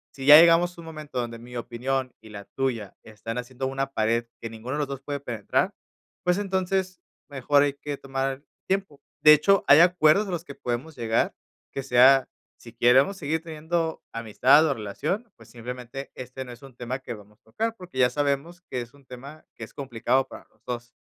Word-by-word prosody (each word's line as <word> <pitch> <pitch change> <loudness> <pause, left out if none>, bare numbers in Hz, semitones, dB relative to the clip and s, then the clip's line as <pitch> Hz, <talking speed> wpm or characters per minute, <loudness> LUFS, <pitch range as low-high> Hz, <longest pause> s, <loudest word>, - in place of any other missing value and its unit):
si 135 - -7
ya 150 +2 +11
llegamos 170 +1 +5
a 170 - -9
un - - -12
momento 155 -5 -6
donde 115 -1 -4
mi 120 +1 -12
opinión 130 +2 -3
y 110 - -14
la 100 -1 -9
tuya 120 -7 -3
están 110 +2 -7
haciendo 130 +2 -4
una 135 0 -3
pared 115 +2 +1 0.2
que 115 - -5
ninguno 115 +4 -7
de 150 - -2
los 145 - -1
2 140 -1 -6
puede 140 +1 -4
penetrar, 120 -6 -1 0.5
pues, 180 +1 +2
entonces, 190 -2 -1 0.3
mejor 140 +1 +2
hay 145 -1 0
que 145 0 -6
tomar 135 +1 -3 0.2
tiempo. 190 -7 -2 0.2
De 150 - +9
hecho, 175 +6 +4
hay 145 +2 +8
acuerdos 180 +2 +4
a 190 - -5
los 170 -1 -3
que 140 - -10
podemos 125 +6 -4
llegar, 115 -2 0 0.4
que 135 - -4
sea, 130 +1 +5 0.3
si 115 -1 -13
queremos 130 +11 +4
seguir 160 0 -2
teniendo 160 +1 -3
amistad 115 +7 +4
o 145 - +1
relación, 180 - -4
pues, - - -18
simplemente 125 +3 -8
este 130 +1 -7
no 125 - -10
es 120 +2 -13
un 135 -3 -13
tema 125 +1 -4
que 130 -2 -7
vamos 105 0 -15
tocar, 225 +1 -3
porque, 180 -9 -9
ya 125 - +5
sabemos 145 +6 -2
que 125 - -2
es 120 +4 -11
un 140 -2 -21
tema 140 +5 -11
que - - -9
es - - -20
complicado 130 0 0
para - - -12
los - - -35
2. 120 -1 -6
135 Hz, 200 wpm, -25 LUFS, 120-155 Hz, 0.5 s, ya